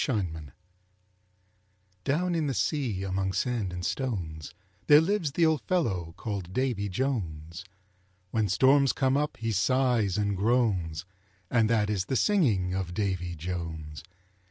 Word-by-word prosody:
DAVY 115 -7 +1
JONES 80 -3 -9 1.6
Down 175 +6 +1
in 160 -3 0
the 135 - -1
sea 110 - -1
among 95 0 -1
sand 110 -1 -1
and 90 0 -5
stones, 85 - -3 0.4
There 145 0 +9
lives 165 -3 0
the 165 +1 +3
old 160 -2 +2
fellow 95 - -1
called 100 -5 -5
Davy 120 -5 0
Jones. 90 - -3 0.7
When 110 -3 +1
storms 135 +6 +4
come 130 -1 +1
up 150 +1 -1
he 115 0 -2
sighs 115 -2 +2
and 100 -1 0
groans, 95 -7 +1 0.5
And 115 -2 +3
that 105 -2 +2
is 95 -3 -1
the 130 - -2
singing 115 - +2
of 95 -2 -3
Davy 95 -4 -2
Jones. 80 -3 -5
105 Hz, 140 wpm, -28 LUFS, 90-130 Hz, 1.6 s, There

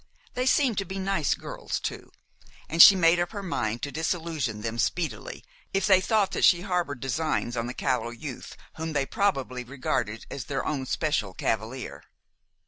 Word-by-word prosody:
They 250 +1 -1
seemed 255 -6 +3
to - - -1
be 190 +2 -6
nice 190 -6 0
girls - - -5
too, - - -6 0.6
and 165 +1 +4
she 200 - +11
made 170 -1 +4
up 175 +4 -1
her 200 -2 -5
mind 120 - -2
to 145 - -2
disillusion 160 - -2
them 115 +1 -4
speedily 180 - -2 0.3
if 195 - +2
they 190 -3 +5
thought 205 -1 +2
that - - -2
she 175 -2 +6
harbored 180 -8 -2
designs 135 -2 -1
on 115 0 -2
the 125 - -6
callow 125 -3 0
youth 125 +2 -8 0.2
whom 160 0 -4
they 140 -2 +1
probably 135 -10 -1
regarded 125 -4 -3
as 135 - -5
their 140 - -3
own 135 -3 -2
special 135 - -1
cavalier. 115 +4 -3
155 Hz, 175 wpm, -27 LUFS, 125-185 Hz, 0.6 s, she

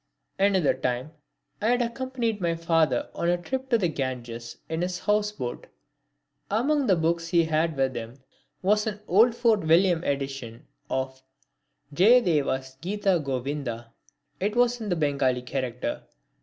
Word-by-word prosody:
Another 195 -6 +3
time 125 +2 -2 0.5
I 215 - +1
had 245 +1 +3
accompanied 235 -3 -2
my 170 -1 +1
father 165 -6 +1
on 170 - -1
a 175 - +3
trip 260 +9 -5
on 235 - +5
the 190 -5 +1
Ganges 120 -6 -5
in 160 +1 -2
his 180 0 -1
houseboat. 210 -10 -1 0.8
Among 270 +6 +1
the 190 - +5
books 165 0 0
he 170 -1 +3
had 160 -1 0
with 135 -1 +1
him 115 +1 -6 0.5
was 210 +3 +2
an 210 -1 -4
old 225 +6 +5
Fort 230 -3 +3
William 170 +1 +3
edition 135 -5 -4 0.2
of 130 0 -3 0.7
Jayadeva's 150 - +3
Gita 195 -1 +1
Govinda. 130 -3 -4 0.5
It 205 +3 -1
was 245 0 +2
in 215 - -4
the 175 - +1
Bengali 140 -5 +1
character. 125 -1 -3
165 Hz, 140 wpm, -26 LUFS, 130-210 Hz, 0.8 s, on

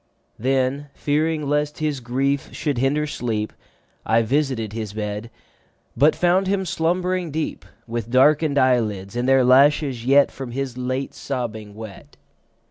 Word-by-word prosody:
Then, 135 +3 0
fearing 150 0 0
lest 150 +1 0
his 150 -3 -1
grief 135 +3 -1
should 145 -6 -1
hinder 145 +4 +1
sleep, 115 -7 -3 0.5
I 115 +1 +2
visited 130 -4 -1
his 110 -3 -5
bed, 105 +1 -4 0.7
But 145 +6 +4
found 180 +2 +2
him 190 0 0
slumbering 180 +1 0
deep, 155 +1 -4 0.2
With 115 -1 -4
darken'd 145 +3 +4
eyelids, 110 -7 +1
and 120 +2 0
their 135 -1 +5
lashes 135 -1 +4
yet 140 +3 +5
10 - - -21
From 130 -3 -6
his 135 -1 -3
late 130 +2 -3
sobbing 110 -6 -5
wet. 110 -2 -11
135 Hz, 140 wpm, -22 LUFS, 115-150 Hz, 0.7 s, their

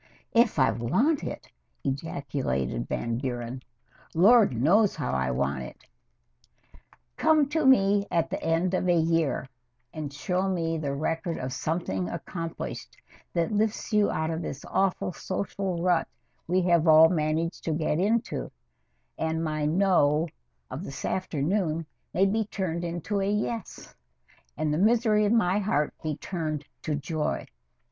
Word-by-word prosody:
"If 235 -4 +4
I 130 -2 +4
want 235 - +1
it!" - - -6 0.3
ejaculated 135 - -2
Van 115 0 -2
Buren. 125 -1 -4 0.5
"Lord 200 - +5
knows 195 - +4
how 65 - -2
I 65 0 0
want 70 +1 -1
it!" 65 - -10 1.3
Come 310 -3 +4
to 310 -2 +1
me 200 -5 +4
at 165 -1 0
the - - -3
end 165 +3 +1
of 185 -1 +1
a 175 - +5
year 165 -4 +1 0.5
and 150 -2 -5
show 180 +6 -1
me 165 -3 -1
the 140 -2 -2
record 165 +3 -2
of 130 0 -4
something 130 - -2
accomplished, 165 - -6 0.4
that 170 +2 0
lifts 215 +1 -1
you 210 -1 +4
out 160 +1 -1
this 140 -3 -6
awful 190 -1 0
social 190 -2 -3
rut 180 -2 +2 0.4
we 180 +2 +2
have 170 -2 +3
all 160 +1 +8
managed 160 0 -1
to 165 - 0
get 155 0 0
into, 225 +5 0 0.7
and 160 0 -1
my 155 -2 -1
"no" 165 -3 +3 0.4
of 145 - -5
this 140 - -6
afternoon 165 -1 -1 0.3
may 190 +3 +3
be 215 +3 +1
turned 180 -5 -3
into 175 +4 -2
a 195 - 0
"yes," 210 0 -3 0.6
and 155 0 0
the 155 - 0
misery 215 0 +3
of 205 - +2
my 205 -4 +3
heart 150 -8 0
be 155 -2 -2
turned 155 -5 -4 0.2
to 155 - -1
joy. 150 +2 -2
165 Hz, 145 wpm, -27 LUFS, 150-195 Hz, 1.3 s, all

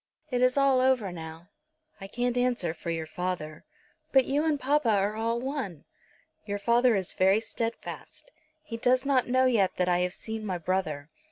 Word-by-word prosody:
It 250 0 0
is 255 +2 +3
all 275 -2 +4
over 255 -7 +2
now." 165 +1 -9 0.5
"I 195 - -8
can't 245 +4 -1
answer 245 -9 0
for 170 - -7
your 165 -1 -2
father." 160 -2 -5 0.5
"But 265 -2 +5
you 285 +3 +1
and 310 -3 +1
papa 275 -1 +1
are 205 0 +2
all 230 +1 -1
one." 245 - -4 0.6
"Your 205 -1 -3
father 235 +3 +3
is 190 -2 -2
very 190 +3 +4
steadfast. 230 - -6 0.3
He 235 -7 -6
does 255 +3 +2
not 270 -3 +2
know 255 +1 +3
yet 220 -7 +2
that 180 - 0
I 175 0 +2
have 180 +1 0
seen 220 -1 -6
my 190 -4 -2
brother. 160 -4 -2
225 Hz, 180 wpm, -28 LUFS, 180-255 Hz, 0.6 s, But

